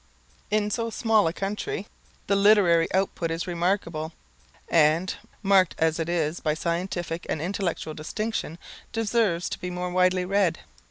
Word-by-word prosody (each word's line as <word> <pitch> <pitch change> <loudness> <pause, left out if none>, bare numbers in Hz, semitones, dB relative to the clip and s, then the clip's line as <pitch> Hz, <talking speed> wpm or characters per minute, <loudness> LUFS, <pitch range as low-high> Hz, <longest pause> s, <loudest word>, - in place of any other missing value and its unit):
In 210 0 +1
so 230 +1 -1
small 220 -3 +2
a - - +1
country 210 - -3 0.4
the 200 - +2
literary 195 -5 +5
output 185 -3 0
is 165 +1 -2
remarkable, 170 -3 -1 0.5
and, 165 +3 +3 0.3
marked 195 -3 +4
as 160 0 +1
it 165 +1 -2
is 165 -1 0
by 155 -1 0
scientific 170 +1 -3
and - - -1
intellectual 175 -2 -2
distinction, 165 +2 -4 0.4
deserves 215 -6 +1
to - - -5
be 180 - -4
more 180 0 -3
widely 185 0 +2
read. 195 -2 +2
180 Hz, 145 wpm, -26 LUFS, 165-200 Hz, 0.5 s, literary